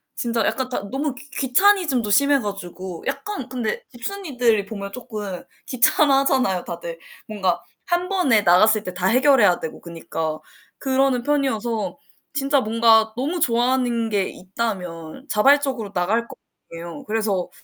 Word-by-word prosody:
진짜 230 -2 -1
약간 260 -1 -1
다 200 -5 -4
너무 275 0 -2
귀 285 +3 -13
귀차니즘도 275 - +2
심해 280 +6 +4
가지고 185 -5 -6
약간 275 -3 -4
근데 255 - -3
집순이들이 245 - -1
보면 200 -2 -6
쪼끔 210 -6 -6 0.2
귀찮아하잖아요, 265 - +3
다들. 170 -1 -7 0.3
뭔가 190 -5 0 0.3
1 350 0 0
번에 355 - +3
나갔을 210 +4 +4
때 185 - -6
다 180 +1 -1
해결해야 250 -5 +4
되고 160 - -7
그니까 165 -2 -4 0.4
그러는 265 -2 +1
편이어서 245 -7 -1 0.4
진짜 280 -1 +1
뭔가 225 -1 +4
너무 300 +8 -2
좋아하는 240 -3 +1
게 200 -3 0
있다면 185 - -5
자발적으로 260 -2 +2
나갈 205 +6 0
거 - - -11 0.4
아니예요. 170 +11 -8
그래서 210 -5 -1
230 Hz, 320 characters per minute, -22 LUFS, 195-270 Hz, 0.4 s, 심해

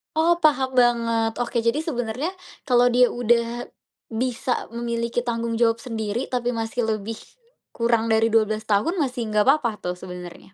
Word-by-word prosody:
Oh, 335 +2 +3
paham 270 -5 +2
banget. 230 -2 +3
Oke, 240 0 -2
jadi 245 +7 +2
sebenarnya, 255 0 -2 0.4
kalau 245 0 +5
dia 245 0 +4
udah 240 0 0 0.5
bisa 250 +1 -2
memiliki 235 +1 -2
tanggung 230 -1 -2
jawab 230 -1 +2
sendiri 225 -1 -3
tapi 245 -1 -1
masih 225 +1 -2
lebih 220 0 -3 0.6
kurang 230 -1 +1
dari 225 +1 +3
12 215 -1 +2
tahun 210 - +2
masih 250 -4 -2
enggak 210 -1 +1
apa-apa 240 -8 +1
tuh 180 - -2
sebenarnya? 180 +1 -10
235 Hz, 150 wpm, -23 LUFS, 225-245 Hz, 0.6 s, kalau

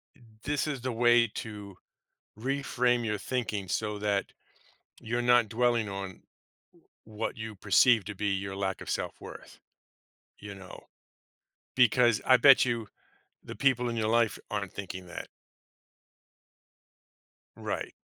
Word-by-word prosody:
Eh, - - -24 0.2
this 145 +2 -1
is 135 -5 -3
the 130 - -2
way 120 0 +4
to 105 -3 -8 0.6
reframe 125 -1 0
your 105 -1 -1
thinking 105 -7 -3
so 105 +3 -2
that 100 -1 -1 0.7
you're 120 +2 -2
not 120 -3 +4
dwelling 120 -2 +1
on 95 -1 -7 0.8
what 110 +2 -5
you 110 -1 -6
perceive 105 +3 +4
to 105 +1 -6
be 105 +2 -2
your 100 0 -2
lack 95 -1 -3
of - - -8
self - - -3
worth, - - -11 0.8
you 105 -1 -9
know? 95 -1 -12 0.9
Because, 120 -2 +4
I 130 - +6
bet 135 +2 +7
you, 115 -3 -2 0.5
the - - -9
people 125 -3 +2
in 120 - -3
your 110 -1 0
life 115 -1 +2
aren't 100 -2 -3
thinking 95 -2 -7
that. 85 - -8 2.3
Right. - - -4
110 Hz, 135 wpm, -29 LUFS, 100-120 Hz, 2.3 s, bet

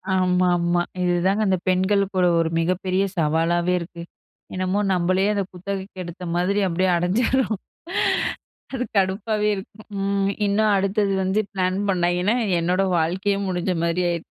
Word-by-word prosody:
ஆமா 180 0 +2
ஆமா. 175 0 +1 0.2
இதுதாங்க 180 +4 +1
அந்த 190 -1 +2
பெண்களுக்குக் 190 +1 +1
கூட 180 -1 +4
ஒரு 165 -1 +1
மிகப்பெரிய 185 +3 0
சவாலாவே 165 +3 +1
இருக்கு. 170 0 -8 0.5
என்னமோ 185 +2 -1
நம்பளே 185 +2 +1
அத 200 - 0
குத்தகைக்கு 190 +1 -6
எடுத்த 175 +1 -9
மாதிரி 185 +4 +1
அப்படியே 185 +2 +1
அடைஞ்சிடுறோம். 220 +6 +1 1.2
அது 255 -2 -1
கடுப்பாகவே 210 +2 +1
இருக்கும். 200 +2 -10 0.2
ம், 200 0 +1 0.2
இன்னும் 210 +1 +2
அடுத்தது 195 +1 +1
வந்து 190 +3 +1
பிளான் 185 -1 0
பண்ணாய்ங்கன்னா, 180 +3 +1 0.2
என்னோடய 180 +2 +1
வாழ்க்கையே 190 +5 0
முடிஞ்ச 180 0 -1
மாரி 170 +1 0
ஆயிரு 170 -1 -3
185 Hz, 135 wpm, -23 LUFS, 175-200 Hz, 1.2 s, கூட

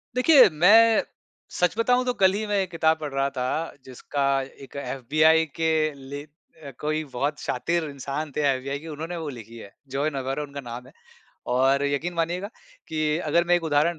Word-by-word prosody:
देखिए 255 -2 +7
मैं, 215 +8 +5 0.5
सच 180 +4 0
बताऊँ 250 +2 +2
तो 250 - 0
कल 190 0 +5
ही 215 +1 -2
मैं 205 -1 0
एक 185 - -3
किताब 160 -1 +2
पढ़ 150 -2 -5
रहा 135 0 +1
था 135 +5 -3
जिसका 135 +2 -4 0.4
एक 135 - -14
एफबीआई 145 +5 +2
के 160 0 0 0.2
ले 140 +1 -8
अ, 150 -1 -15
कोई 155 +1 -1
बहुत 145 +4 -2
शातिर 165 +6 -1
इंसान 140 +2 -5
थे - - +1
एफबीआई 135 +2 -3
के 165 - -11
उन्होंने 160 +3 -5
वो 160 -2 -5
लिखी 115 -2 -10
है 100 -3 -11 0.2
जॉन 145 +2 0
अवेरो 135 +3 -3
उनका 140 -1 -8
नाम 120 +1 -8
है। - - -18 0.6
और 135 +2 +3
यकीन 150 +5 -2
मानिएगा 175 +4 -2 0.4
कि 155 0 0
अगर 170 +1 +1
मैं 175 - +4
एक 170 -1 0
उदाहरण 155 +2 +1
155 Hz, 185 wpm, -25 LUFS, 140-170 Hz, 0.6 s, देखिए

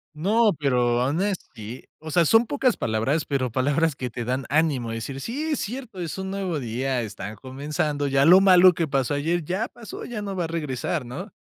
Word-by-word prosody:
No, 210 +6 +3
pero, 125 -3 +2
honestly, 135 - -3
o 155 0 -8
sea, 170 +2 +3
son 225 +8 +5
pocas 260 -3 +1
palabras, 115 +8 0
pero 130 -4 -1
palabras 145 +5 +1
que 125 -2 -4
te 120 +1 -5
dan 130 +1 -2
ánimo 145 -6 +1
de 115 - -3
decir, 135 +4 -5
sí, 265 +7 -4
es 295 - 0
cierto, 235 -3 -6
es 170 +1 -4
un 190 0 -4
nuevo 185 -6 -2
día, 125 +2 -2
están 105 0 -7
comenzando, 145 +4 -2
ya 135 0 +3
lo 180 +4 +8
malo 185 -1 +7
que 165 -1 -1
pasó 135 0 0
ayer 165 +4 0
ya 195 +8 -1
pasó, 235 -3 -9
ya 215 -4 -5
no 195 -1 -4
va 175 -2 -1
a - - -3
regresar, 150 -2 -3
¿no? 180 - -7
150 Hz, 205 wpm, -24 LUFS, 130-190 Hz, -, lo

